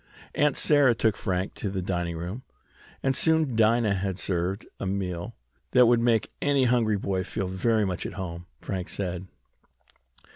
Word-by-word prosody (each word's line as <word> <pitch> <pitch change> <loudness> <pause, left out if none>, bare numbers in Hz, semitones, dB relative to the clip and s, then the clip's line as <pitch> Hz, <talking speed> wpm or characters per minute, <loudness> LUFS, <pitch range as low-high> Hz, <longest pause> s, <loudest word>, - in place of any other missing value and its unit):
Aunt 150 -1 +2
Sarah 145 -5 +4
took 110 -2 +2
Frank 95 0 -2
to 100 - -4
the 95 0 -3
dining 85 -2 -2
room, 90 +9 -5 0.6
and 135 0 +2
soon 160 -6 +3
Dinah 110 -1 +3
had 95 -1 -2
served 95 +2 -2
a 100 - -3
meal 90 -3 -3 0.4
that 125 -1 +7
would 120 0 +4
make 115 -2 +2
any 140 -2 +3
hungry 115 -4 +2
boy 95 -1 -1
feel 95 - -3
very 105 +4 +1
much 90 -2 -2
at - - -8
home, 85 -2 -6
Frank 95 -3 -4
said. 90 -1 -3
100 Hz, 160 wpm, -26 LUFS, 90-120 Hz, 0.6 s, that